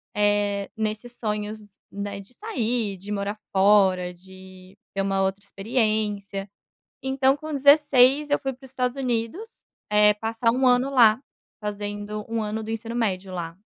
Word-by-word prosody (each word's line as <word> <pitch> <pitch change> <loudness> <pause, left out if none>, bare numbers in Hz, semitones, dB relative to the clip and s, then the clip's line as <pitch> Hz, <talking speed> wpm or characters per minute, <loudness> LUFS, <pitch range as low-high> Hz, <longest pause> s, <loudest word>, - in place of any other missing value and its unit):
eh, 205 -1 +1
nesses 220 +3 -3
sonhos, 210 -1 -3 0.3
né, 200 0 -5
de 200 +6 -17
sair, 240 - -2
de 200 +3 -8
morar 205 +1 -2
fora, 190 -2 +4
de 185 +1 -15 0.2
ter 195 - +1
uma 195 0 0
outra 190 +1 -1
experiência. 205 -2 -1 0.5
Então 265 0 +2
com 310 +1 -7
16, 285 0 +5
eu 290 - +3
fui 270 - -3
para 260 +1 -16
os 265 - -11
Estados 250 0 -1
Unidos, 255 - -3 0.3
eh, 210 0 +5
passar 225 +2 0
1 260 +2 +1
ano 250 +1 +4
lá, 235 -3 +5 0.4
fazendo 205 0 -5
1 230 0 -1
ano 215 +1 -3
do 220 - -6
ensino 225 +1 -4
médio 195 -5 -1
lá. 170 0 -5
215 Hz, 155 wpm, -24 LUFS, 200-250 Hz, 0.5 s, 16